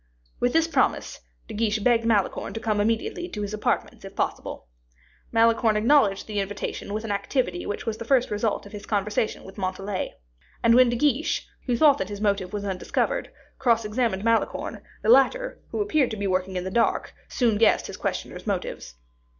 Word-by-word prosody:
With 245 - +1
this 325 0 +3
promise, 330 - 0 0.3
De - - -8
Guiche 215 0 +1
begged 235 -1 +3
Malicorne 210 -4 +1
to - - -2
come 215 -2 0
immediately 230 - -1
to 210 -9 -4
his 205 +1 -4
apartments, 215 - -1
if - - -10
possible. - - -3 0.7
Malicorne 225 -1 +3
acknowledged 215 -4 +3
the 210 -2 -3
invitation 200 0 -4
with 215 - -3
an 225 - -3
activity 200 -2 -1
which 205 - -4
was 220 -1 -2
the - - -6
first 255 0 +2
result 210 0 -1
of 200 - -12
his 205 -1 -9
conversation 210 +1 -1
with 195 +2 -11
Montalais. 190 +1 -3 0.5
And 230 - +6
while 250 0 +6
De 240 - 0
Guiche, 295 +4 +1 0.2
who 245 -2 +1
thought 290 +1 +5
that 190 - -3
his 205 -1 -6
motive 200 -3 0
was 205 -1 -4
undiscovered, 195 - -1 0.3
cross 230 -3 +2
examined 210 -3 0
Malicorne, 230 0 0 0.2
the 215 - +1
latter, 460 - +4
who - - -2
appeared 310 -10 +2
to 220 - -5
be 205 - -3
working 185 0 -1
in 180 - -2
the 190 - -4
dark, 230 +3 +1 0.2
soon 230 -5 +1
guessed 225 - +4
his - - -6
questioner's - - -4
motives. - - -3
220 Hz, 190 wpm, -25 LUFS, 200-240 Hz, 0.7 s, And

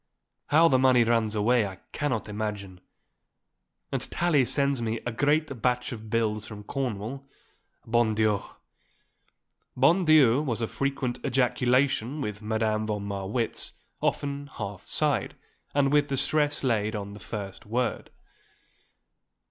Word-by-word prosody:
How 160 +3 +6
the 130 -5 +3
money 130 -2 +5
runs 115 -2 +1
away 110 +1 +3
I 95 - -8 0.2
cannot 130 -8 -2
imagine. 105 -3 -5 1.1
And - - -1
Tallie 155 -7 +2
sends 140 -1 +1
me 115 0 -1
a 120 - -1
great 140 +1 0
batch 125 0 0
of 110 -2 -8
bills 110 -2 0
from 105 -1 -9
Cornwall, 130 +2 -4 0.6
bon 115 -1 +2
Dieu!" 110 -2 +2 1.4
Bon 165 +9 +4
Dieu 145 -5 +5
was 125 -7 -2
a 115 - 0
frequent 135 0 -2
ejaculation 125 +1 +1
with 105 -5 -4
Madame 110 0 0
von 105 -2 -2
Marwitz, 100 +4 -2 0.3
often 140 0 -1
half 105 -7 -7
sighed, - - 0 0.4
and 140 -1 +3
with 145 -1 +4
the 135 - -2
stress 145 +1 +1
laid 110 -4 +1
on 100 -1 -5
the 105 - -10
first 100 0 -7
word. 120 +2 -1
120 Hz, 130 wpm, -27 LUFS, 105-140 Hz, 1.4 s, How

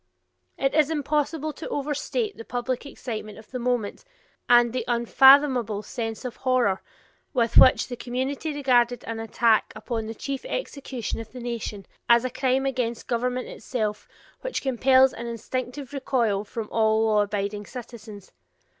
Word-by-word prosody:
It 270 - 0
is 305 -1 +4
impossible 300 0 -1
to 315 - -7
overstate 300 - -2
the 225 - -9
public 245 +3 -3
excitement 215 -6 -6
of 220 - -15
the 255 - -4
moment 240 -4 -1 0.5
and 240 -1 +6
the 255 - -1
unfathomable 245 -2 +5
sense 225 -1 -5
of 245 - -5
horror 255 -7 +1 0.5
with 235 -2 +1
which 255 - +7
the 245 - -5
community 260 +6 -3
regarded 245 -4 +2
an 225 0 -5
attack 225 0 +2
upon 220 0 -4
the 225 - -6
chief 275 +3 -4
executive 260 - -4
of - - -29
the 255 - -7
nation, 235 -4 -5 0.2
as 235 +1 +6
a 255 - -2
crime 260 +1 +1
against 245 -3 -2
government 250 +1 -1
itself 215 -4 -4 0.3
which - - -4
compels 265 0 +4
an 235 - -6
instinctive 255 +4 -5
recoil 235 -7 0
from 220 0 -5
all 220 0 +3
law 215 -1 +3
abiding 205 0 -3
citizens. 220 -5 -10
245 Hz, 150 wpm, -25 LUFS, 225-265 Hz, 0.5 s, which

